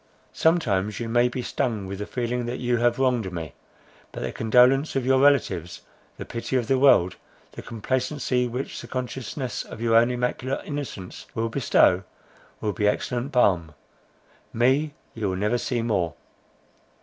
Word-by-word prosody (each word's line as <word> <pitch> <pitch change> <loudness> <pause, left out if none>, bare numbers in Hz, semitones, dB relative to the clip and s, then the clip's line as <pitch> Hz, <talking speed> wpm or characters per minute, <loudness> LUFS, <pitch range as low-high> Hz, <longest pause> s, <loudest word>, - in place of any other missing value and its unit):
Sometimes 105 - +1
you 115 - -3
may 120 +2 +3
be 125 +1 -4
stung 110 -6 -2
with 95 +1 -6
the 105 - -4
feeling 120 0 -2
that 120 - -3
you 120 -1 0
have 120 0 +2
wronged 125 -7 +1
me, 80 -5 -6 0.6
but - - -7
the - - -2
condolence 125 +6 +3
of 135 -2 0
your 130 0 +4
relatives, 110 - +2 0.4
the - - -6
pity 115 +2 -4
of 125 -2 +1
the 135 -1 +2
world, 95 -10 +5 0.3
the - - -9
complacency 125 +2 -1
which 125 +3 -5
the - - -10
consciousness 130 +1 -4
of - - -10
your 115 -1 +2
own 115 +1 +6
immaculate 125 +2 -2
innocence 140 -11 -6
will 115 0 -1
bestow, 110 -7 +3 0.6
will 105 -1 -1
be 105 -1 +1
excellent 120 +5 -1
balm;—me 120 - -1 0.2
you 110 -4 -2
will 95 - -2
never 105 +5 +1
see 120 -2 -1
more!" 90 -8 0
120 Hz, 160 wpm, -25 LUFS, 105-130 Hz, 0.6 s, own